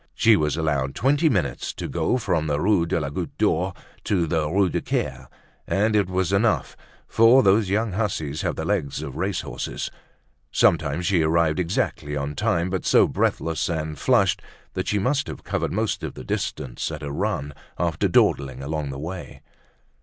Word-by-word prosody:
She 115 -1 +5
was 75 -4 0
allowed 70 -4 -1
twenty 145 +8 +3
minutes 95 - -1
to - - -5
go 125 - 0
from 90 -9 0
the 75 -1 0
Rue 90 -1 +2
de 85 - 0
la 70 -3 -3
Goutte - - -5
d'Or 90 +4 +1 0.3
to 90 -5 +1
the 80 -2 0
Rue 95 +3 +3
du - - -2
Caire, - - -3 0.4
and 105 +2 +1
it 100 -3 +2
was 95 0 0
enough, 100 - +1 0.3
for 115 +4 +6
these 100 0 +4
young 105 +2 +1
hussies 90 -8 -2
have - - -1
the 80 - -4
legs 80 -7 -1
of 70 -4 -7
racehorses. 95 +3 -3 0.6
Sometimes 80 +1 +2
she 90 -2 +3
arrived 80 0 +2
exactly 80 -4 -1
on 70 +1 -3
time 85 +5 0
but 95 - -2
so - - +5
breathless 80 -3 0
and 80 -2 -2
flushed - - +3 0.3
that - - -3
she 105 - +1
must 135 +8 0
have - - -7
covered - - -2
most - - -1
of - - -5
the - - -8
distance 60 +3 -3
at 75 -1 -6
a 70 - -4
run 70 0 -2 0.2
after 85 -2 0
dawdling 65 -1 +2
along 75 0 -3
the 70 - -5
way. 85 +5 -7
85 Hz, 180 wpm, -24 LUFS, 75-100 Hz, 0.6 s, for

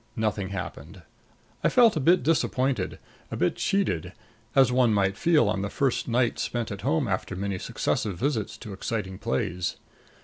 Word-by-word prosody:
Nothing 105 -3 -1
happened. 95 -2 -7 0.6
I - - +4
felt 235 -5 +5
a - - +1
bit 170 +2 +4
disappointed, 135 -3 0 0.3
a - - -4
bit - - +1
cheated, 90 - 0 0.4
as 135 -2 +5
one 125 -3 +3
might 95 -1 +2
feel 155 -2 +3
on 105 -2 0
the 100 - -2
first 135 +2 0
night 120 0 +1
spent 120 -2 -2
at 100 - -6
home 145 +2 +1
after 95 -1 -2
many 100 0 -3
successive 100 0 -2
visits 115 - -1
to 110 -4 -8
exciting 95 -1 -4
plays. 85 +6 -1
110 Hz, 165 wpm, -26 LUFS, 95-135 Hz, 0.6 s, felt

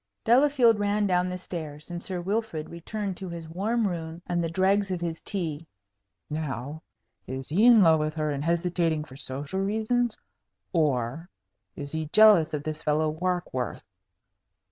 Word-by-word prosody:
Delafield 245 -3 +4
ran 205 0 +1
down 180 -1 +2
the 180 - -3
stairs, 160 -3 -7
and 175 0 -4
Sir 180 -2 -4
Wilfrid 195 -4 -2
returned 190 +3 -4
to 190 - -6
his 170 -1 -7
warm 210 +7 0
room 165 -2 -5
and 175 -1 -1
the 165 - -1
dregs 195 +3 +2
of 185 -2 -2
his 170 -1 -4
tea. 165 -5 -3 0.6
"Now 150 -1 -4 0.5
is 130 +1 -5
he 200 +10 +4
in 230 -4 +8
love 160 -2 +5
with 155 +1 -2
her, 155 -1 -1
and 140 0 -3
hesitating 170 -1 0
for 130 -4 -13
social 140 +5 -5
reasons? 220 +4 0 0.6
Or 150 0 0 0.5
is 140 0 -7
he 160 -1 -3
jealous 200 -3 +6
of 145 - -4
this 155 0 -4
fellow 155 +1 +1
Warkworth? 175 -7 -2
170 Hz, 160 wpm, -27 LUFS, 155-195 Hz, 0.6 s, in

